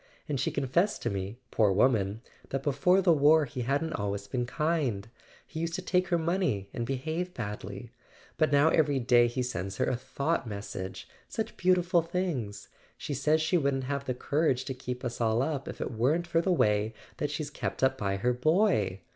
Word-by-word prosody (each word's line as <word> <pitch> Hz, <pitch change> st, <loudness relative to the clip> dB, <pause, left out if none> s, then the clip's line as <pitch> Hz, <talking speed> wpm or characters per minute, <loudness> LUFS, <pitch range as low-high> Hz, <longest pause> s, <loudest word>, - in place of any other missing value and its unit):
And 145 Hz, -3 st, -1 dB
she 135 Hz, -, +1 dB
confessed 145 Hz, +9 st, 0 dB
to -, -, 0 dB
me, 100 Hz, +3 st, -4 dB
poor 105 Hz, -3 st, +3 dB
woman, 105 Hz, -1 st, +2 dB, 0.3 s
that 135 Hz, 0 st, -2 dB
before 180 Hz, +7 st, +3 dB
the 175 Hz, -, +5 dB
war 150 Hz, +1 st, +5 dB
he 125 Hz, -1 st, -5 dB
hadn't 145 Hz, +6 st, 0 dB
always 100 Hz, -1 st, -3 dB
been 120 Hz, +4 st, -2 dB
kind: 140 Hz, -9 st, -1 dB, 0.4 s
he 160 Hz, -, -7 dB
used 165 Hz, 0 st, -2 dB
to -, -, -3 dB
take 185 Hz, 0 st, +1 dB
her 175 Hz, -, +2 dB
money, 165 Hz, -, 0 dB
and 120 Hz, -2 st, -3 dB
behave 160 Hz, +7 st, -3 dB
badly. 105 Hz, +1 st, -6 dB, 0.4 s
But 155 Hz, -2 st, +2 dB
now 145 Hz, +2 st, +5 dB
every 150 Hz, -4 st, +3 dB
day 120 Hz, -1 st, +4 dB
he 125 Hz, +2 st, -2 dB
sends 95 Hz, -5 st, -4 dB
her -, -, +1 dB
a -, -, 0 dB
thought 135 Hz, +3 st, -2 dB
message—such 100 Hz, -, -6 dB
beautiful 180 Hz, -1 st, +3 dB
things! 160 Hz, -, -3 dB, 0.3 s
She 145 Hz, -, -4 dB
says 150 Hz, +4 st, +2 dB
she 165 Hz, +3 st, +2 dB
wouldn't 140 Hz, -2 st, 0 dB
have 140 Hz, +1 st, -3 dB
the 130 Hz, -, -2 dB
courage 140 Hz, -1 st, 0 dB
to 130 Hz, -, -3 dB
keep 125 Hz, 0 st, -6 dB
us 120 Hz, 0 st, -4 dB
all 115 Hz, +2 st, +2 dB
up 140 Hz, -2 st, -3 dB
if -, -, -7 dB
it -, -, -3 dB
weren't 135 Hz, +10 st, +1 dB
for 170 Hz, -1 st, +1 dB
the 185 Hz, -, 0 dB
way 105 Hz, -7 st, +2 dB, 0.2 s
that 145 Hz, -, -1 dB
she's 150 Hz, 0 st, -4 dB
kept -, -, -4 dB
up 130 Hz, 0 st, +4 dB
by 100 Hz, -3 st, -1 dB
her 125 Hz, +5 st, +1 dB
boy. 125 Hz, -, +2 dB
135 Hz, 195 wpm, -29 LUFS, 115-160 Hz, 0.4 s, the